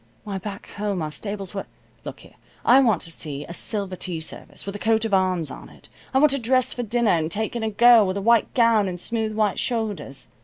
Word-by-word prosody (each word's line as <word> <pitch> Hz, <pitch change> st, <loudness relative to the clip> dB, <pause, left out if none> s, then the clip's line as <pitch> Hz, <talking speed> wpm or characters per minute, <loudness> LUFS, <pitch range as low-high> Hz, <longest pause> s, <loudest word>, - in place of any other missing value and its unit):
Why, 200 Hz, -2 st, -4 dB
back 200 Hz, +1 st, -8 dB
home 205 Hz, -4 st, -2 dB
our 155 Hz, -, -4 dB
stables 200 Hz, +3 st, -6 dB
were 195 Hz, -, -5 dB, 0.4 s
Look -, -, -8 dB
here. -, -, -17 dB, 0.3 s
I 255 Hz, +3 st, +7 dB
want 225 Hz, -10 st, +2 dB
to 165 Hz, -, -10 dB
see 150 Hz, -3 st, -5 dB
a 170 Hz, -, -8 dB
silver 195 Hz, 0 st, -3 dB
tea 175 Hz, -2 st, -2 dB
service, 160 Hz, -, -5 dB
with 200 Hz, 0 st, -5 dB
a -, -, -6 dB
coat 220 Hz, +1 st, +1 dB
of 220 Hz, -, -3 dB
arms 185 Hz, -4 st, +1 dB
on -, -, -10 dB
it. -, -, -19 dB, 0.2 s
I 265 Hz, -, +1 dB
want 295 Hz, +1 st, +5 dB
to 275 Hz, -, 0 dB
dress 255 Hz, +1 st, +2 dB
for 245 Hz, -, -4 dB
dinner, 235 Hz, -1 st, +1 dB
and 160 Hz, -2 st, +1 dB
take 220 Hz, +7 st, -2 dB
in 235 Hz, -, -2 dB
a 220 Hz, -, -1 dB
girl 225 Hz, 0 st, +6 dB
with 185 Hz, +1 st, -2 dB
a -, -, -1 dB
white 230 Hz, +1 st, +3 dB
gown 230 Hz, -4 st, +4 dB
and 180 Hz, -1 st, -4 dB
smooth 220 Hz, +1 st, -2 dB
white 215 Hz, -2 st, +1 dB
shoulders. 215 Hz, -, -3 dB
210 Hz, 240 wpm, -23 LUFS, 185-230 Hz, 0.4 s, I